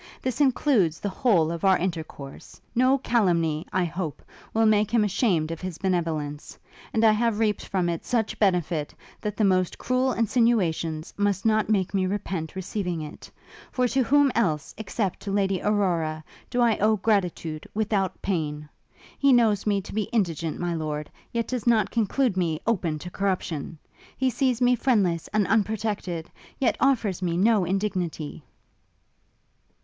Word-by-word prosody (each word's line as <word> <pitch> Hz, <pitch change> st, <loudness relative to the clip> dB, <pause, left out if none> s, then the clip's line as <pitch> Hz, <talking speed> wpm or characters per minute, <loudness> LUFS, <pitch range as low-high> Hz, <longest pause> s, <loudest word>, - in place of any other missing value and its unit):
This 255 Hz, +2 st, -2 dB
includes 245 Hz, -, +2 dB
the 205 Hz, -, -2 dB
whole 185 Hz, -6 st, +2 dB
of 170 Hz, -1 st, -5 dB
our 190 Hz, -1 st, +5 dB
intercourse! 160 Hz, -6 st, -6 dB
No 255 Hz, +3 st, +4 dB
calumny, 170 Hz, -, +1 dB
I 185 Hz, -2 st, +1 dB
hope, 170 Hz, -2 st, -5 dB, 0.3 s
will 225 Hz, 0 st, +2 dB
make 215 Hz, -1 st, +3 dB
him 230 Hz, -1 st, +3 dB
ashamed 190 Hz, -6 st, +1 dB
of 165 Hz, -, -6 dB
his 185 Hz, -3 st, -5 dB
benevolence; 160 Hz, -6 st, -2 dB, 0.3 s
and 220 Hz, -, +1 dB
I 220 Hz, -, +7 dB
have 225 Hz, 0 st, +1 dB
reaped 215 Hz, -2 st, 0 dB
from 185 Hz, -3 st, 0 dB
it 170 Hz, -1 st, -2 dB
such 230 Hz, -4 st, -1 dB
benefit, 175 Hz, -6 st, +1 dB, 0.3 s
that 210 Hz, -1 st, -4 dB
the 220 Hz, -, +2 dB
most 185 Hz, -2 st, +2 dB
cruel 255 Hz, +1 st, +1 dB
insinuations 190 Hz, -9 st, +1 dB
must 205 Hz, -1 st, 0 dB
not 215 Hz, -1 st, +2 dB
make 195 Hz, -3 st, +1 dB
me 190 Hz, -1 st, +1 dB
repent 185 Hz, -5 st, -3 dB
receiving 185 Hz, -2 st, -3 dB
it; 150 Hz, -, -10 dB, 0.4 s
for 250 Hz, -1 st, +1 dB
to 270 Hz, -, +2 dB
whom 280 Hz, +2 st, +4 dB
else, 160 Hz, -11 st, 0 dB
except 210 Hz, -2 st, -3 dB
to 200 Hz, -, -5 dB
Lady 195 Hz, -2 st, +1 dB
Aurora, 170 Hz, -7 st, 0 dB, 0.3 s
do 245 Hz, -1 st, 0 dB
I 230 Hz, -3 st, +3 dB
owe 215 Hz, +2 st, +4 dB
gratitude 180 Hz, -7 st, -1 dB
without 205 Hz, -4 st, -1 dB
pain? 150 Hz, -5 st, -2 dB, 0.5 s
He 280 Hz, -1 st, +4 dB
knows 220 Hz, -5 st, +3 dB
me 200 Hz, -1 st, +2 dB
to 195 Hz, -, -10 dB
be 215 Hz, -1 st, -2 dB
indigent, 170 Hz, -8 st, -1 dB
my 175 Hz, -1 st, -1 dB
lord, 150 Hz, -2 st, -4 dB, 0.2 s
yet 230 Hz, -1 st, -1 dB
does 250 Hz, -2 st, -3 dB
not 215 Hz, -4 st, +3 dB
conclude 235 Hz, 0 st, +1 dB
me 165 Hz, -4 st, 0 dB
open 180 Hz, -9 st, 0 dB
to 180 Hz, +4 st, -8 dB
corruption! 175 Hz, -5 st, -2 dB, 0.4 s
He 260 Hz, 0 st, +1 dB
sees 255 Hz, 0 st, 0 dB
me 245 Hz, 0 st, +5 dB
friendless 200 Hz, -10 st, +1 dB
and 215 Hz, -1 st, +1 dB
unprotected, 205 Hz, -4 st, -1 dB, 0.3 s
yet 255 Hz, -, +1 dB
offers 225 Hz, -9 st, +1 dB
me 170 Hz, -2 st, -1 dB
no 205 Hz, 0 st, +3 dB
indignity!' 180 Hz, -5 st, -2 dB
195 Hz, 160 wpm, -25 LUFS, 170-225 Hz, 0.5 s, I